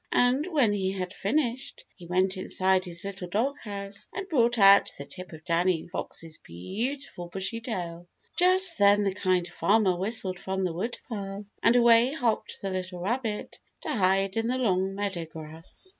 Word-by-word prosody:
And 255 +6 +3
when 280 - +2
he 190 -1 -1
had 185 -1 -4
finished, 250 +4 -2
he 175 -3 -12
went 185 +2 +1
inside 185 0 +1
his 170 +1 -5
little 195 -2 -5
doghouse 205 -2 -3
and 390 0 -5
brought 240 -8 +2
out 200 -1 +7
the 140 - -7
tip 180 +6 -10
of 160 -1 -12
Danny 170 -1 +1
Fox's 165 -2 -6
beautiful 200 - -5
bushy 195 +5 -3
tail. 175 -7 -5 0.3
Just 365 -1 +4
then 205 +1 +5
the 195 -1 0
Kind 185 -2 +1
Farmer 195 +1 +2
whistled 190 -1 -2
from 190 0 -2
the 180 -3 -1
woodpile, 200 0 -5 0.2
and 230 - +4
away 235 +2 +5
hopped 245 -10 -1
the 195 - -2
little 185 -1 -4
rabbit 220 +2 -3 0.2
to - - -5
hide 195 -1 +2
in 225 0 +1
the 255 +2 0
long 195 -5 +1
meadow 195 -4 -2
grass. 160 - -8
195 Hz, 165 wpm, -27 LUFS, 185-235 Hz, 0.3 s, out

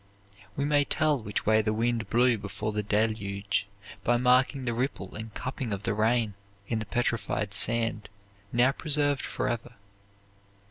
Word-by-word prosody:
We 140 - -1
may 145 0 +3
tell 150 -2 +1
which 105 -1 -3
way 110 +1 +4
the 110 0 0
wind 115 -1 0
blew 120 +2 +4
before 100 +2 -4
the 105 0 -1
Deluge 105 -1 -1 0.4
by 120 +1 +3
marking 130 +2 +3
the 120 - 0
ripple 120 -6 -3
and 110 +1 -6
cupping 130 -2 -4
of 100 0 -3
the 115 -1 0
rain 110 0 +1 0.3
in 115 - -1
the 110 - -5
petrified 115 -3 -1
sand 110 0 +2 0.4
now 120 +3 +4
preserved 145 -1 +1
forever. 120 +1 -3
115 Hz, 150 wpm, -28 LUFS, 105-125 Hz, 0.4 s, way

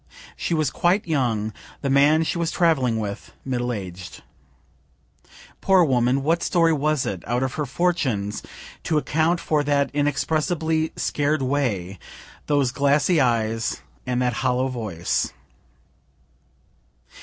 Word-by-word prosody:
She 170 - -1
was 155 -3 +1
quite 180 +4 +1
young 120 -9 0 0.3
the 140 - -1
man 145 +4 +5
she 170 - -2
was 170 -1 0
traveling 135 -11 +2
with, 100 -2 -6
middle 125 -2 -1
aged. 95 -5 -7 1.4
Poor 190 -2 +5
woman 130 -2 +2
what 165 +4 +1
story 165 -2 +3
was 150 -1 0
it, 95 -3 -4
out 120 +3 0
of 130 - -2
her 150 -2 -3
fortunes, 135 - -1 0.4
to 155 - 0
account 160 +3 +1
for 150 -3 0
that 145 -1 +1
inexpressibly 155 +3 0
scared 145 -1 0
way, 110 -10 -1 0.5
those 140 -4 +2
glassy 145 +5 +2
eyes, 115 -2 0 0.2
and 125 -1 0
that 125 -1 +1
hollow 130 0 +1
voice? 105 -9 -2
140 Hz, 125 wpm, -23 LUFS, 120-155 Hz, 1.4 s, man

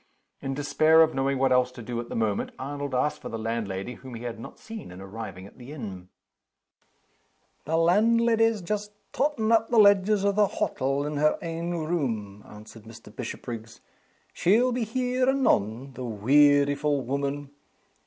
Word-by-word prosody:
In 135 -1 -3
despair 155 +3 +4
of 160 - 0
knowing 135 0 0
what 135 0 +2
else 125 0 +3
to 120 - -9
do 120 +1 -4
at 120 - -6
the - - -5
moment, 110 -3 -1
Arnold 140 0 -4
asked 140 +4 0
for - - -7
the 115 - -4
landlady, 110 -1 -3
whom 130 -1 -10
he 115 - -8
had 115 -2 -5
not 115 - -10
seen 220 - -9
on 90 - -10
arriving 95 -1 -8
at 100 - -16
the 125 +3 -10
inn. 100 -11 -8 1.6
"The 160 +2 0
landleddy's 225 +4 +3
just 210 +2 -3 0.2
tottin' 270 -7 0
up 225 -1 +3
the 240 - +1
ledgers 200 -1 +5
o' 200 - +4
the 205 0 +3
hottle 135 -4 -1
in 150 0 -3
her 150 +1 +3
ain 165 0 -4
room," 120 - -3
answered 105 +1 -13
Mr. 115 -1 -13
Bishopriggs. 115 -2 -7 0.5
"She'll 230 +8 +3
be 240 -1 -1
here 255 +3 0
anon 135 - +1
the 130 +1 -7
wearyful 145 +5 +3
woman! 140 +2 -3
140 Hz, 165 wpm, -26 LUFS, -, 1.6 s, ledgers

